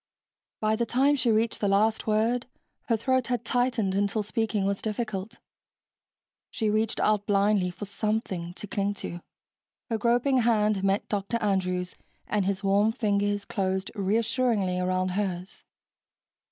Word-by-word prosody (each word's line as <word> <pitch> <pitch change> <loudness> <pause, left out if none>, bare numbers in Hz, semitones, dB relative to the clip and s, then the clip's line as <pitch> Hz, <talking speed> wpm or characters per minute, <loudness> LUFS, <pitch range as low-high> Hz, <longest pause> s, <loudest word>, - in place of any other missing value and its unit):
By 215 0 +2
the 235 +1 -1
time 275 +5 +3
she 255 -3 0
reached 225 +1 +1
the 205 - +1
last 215 +3 +2
word, 225 +4 +1 0.4
her 230 - +2
throat 260 +2 +1
had 245 -2 -2
tightened 240 -6 +1
until 200 +2 0
speaking 215 -1 -1
was 200 0 -1
difficult. 215 -1 -4 1.1
She 215 -2 -1
reached 220 +2 0
out 210 -1 +2
blindly 200 -2 +3
for 180 +4 -7
something 200 -4 -2
to - - -7
cling 200 0 -1
to. 175 -3 -6 0.7
Her 225 - 0
groping 245 +4 +3
hand 215 -4 +2
met 195 +1 +1
Dr. 205 +2 -1
Andrews' 185 -4 -1 0.3
and 210 -2 0
his 200 +1 -1
warm 200 +3 +3
fingers 205 -2 0
closed 190 -2 -2
reassuringly 215 -2 +1
around 185 0 0
hers. 185 -1 -3
210 Hz, 140 wpm, -27 LUFS, 195-225 Hz, 1.1 s, time